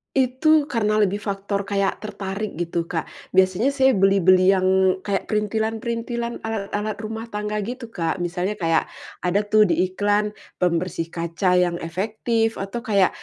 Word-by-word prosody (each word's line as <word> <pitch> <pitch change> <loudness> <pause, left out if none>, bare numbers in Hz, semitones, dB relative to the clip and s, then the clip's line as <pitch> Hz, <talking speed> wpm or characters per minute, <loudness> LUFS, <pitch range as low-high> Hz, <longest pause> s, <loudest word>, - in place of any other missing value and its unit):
Itu 285 +4 +3
karena 215 -5 +1
lebih 205 0 +1
faktor 200 0 -2
kayak 200 0 -1
tertarik 200 -2 -5
gitu, 170 0 -1
Kak. 165 -1 -4 0.2
Biasanya 190 +7 +3
saya 265 -2 +3
beli-beli 190 -1 +5
yang 185 -1 +2 0.3
kayak 195 0 -2
printilan-perintilan, 230 +2 -2
alat-alat 210 -1 -3
rumah 220 +1 -5
tangga 210 0 -3
gitu, 245 +3 -6
Kak. 170 -6 -2
Misalnya 180 +4 -2
kayak, 165 -2 +1 0.3
ada 180 +3 +2
tuh 215 0 +5
di 175 +3 +2
iklan, 205 +2 0 0.2
pembersih 170 -1 0
kaca 170 +2 0
yang 175 -1 +2
efektif, 220 +6 -1
atau 195 +5 -4
kaya 200 -4 +3
205 Hz, 140 wpm, -23 LUFS, 185-220 Hz, 0.3 s, beli-beli